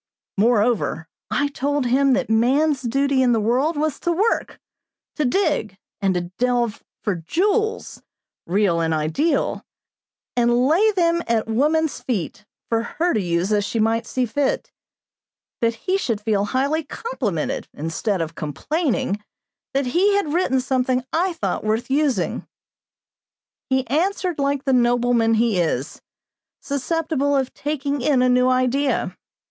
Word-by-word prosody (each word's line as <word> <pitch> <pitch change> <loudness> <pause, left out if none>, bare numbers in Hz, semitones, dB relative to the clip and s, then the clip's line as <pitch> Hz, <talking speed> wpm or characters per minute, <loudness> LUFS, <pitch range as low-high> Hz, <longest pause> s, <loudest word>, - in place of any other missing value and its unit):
Moreover, 215 -5 +1 0.2
I 285 0 0
told 285 0 -1
him 265 +2 +3
that 260 - 0
man's 265 +6 +2
duty 275 +2 +1
in 250 -2 +4
the 225 - +2
world 255 +9 +1
was 305 -1 -1
to 345 - 0
work, 405 +7 0 0.6
to 305 - 0
dig 275 - 0 0.2
and 180 -2 -1
delve 240 -3 0 0.2
for 200 -5 0
jewels, 415 - -1 0.5
real 185 -1 +2
and 165 -1 +1
ideal, 160 - 0 0.7
and 240 +1 +3
lay 350 +10 +4
them 340 -2 +2
at 230 -2 +1
woman's 300 +7 +1
feet, 210 -2 -4 0.2
for 225 -1 +1
her 335 +9 -1
to 215 - +1
use 175 +2 -1
as 205 -1 +2
she 215 - -3
might 225 +1 +1
see 255 -1 0
fit; 270 +4 -1 0.9
that 230 -1 +1
he 380 +10 -1
should 230 - -1
feel 210 -2 0
highly 280 +8 0
complimented, 255 - -3
instead 165 +5 -2
of 165 0 -3
complaining, 240 - -2 0.5
that 275 0 +1
he 370 +11 +2
had 320 -7 0
written 325 -7 +2
something 255 0 0
I 355 +3 +1
thought 325 - -2
worth 220 +4 -1
using. 285 -2 0 1.2
He 260 0 +1
answered 350 - -1
like 280 0 0
the 270 - +1
nobleman 240 -2 +3
he 220 -4 +2
is; 155 -4 -2 0.6
susceptible 285 0 -1
of 265 -1 -1
taking 290 -1 -2
in 255 -1 +3
a 255 - +3
new 250 +1 +4
idea. 255 +2 +1
255 Hz, 140 wpm, -22 LUFS, 220-295 Hz, 1.2 s, in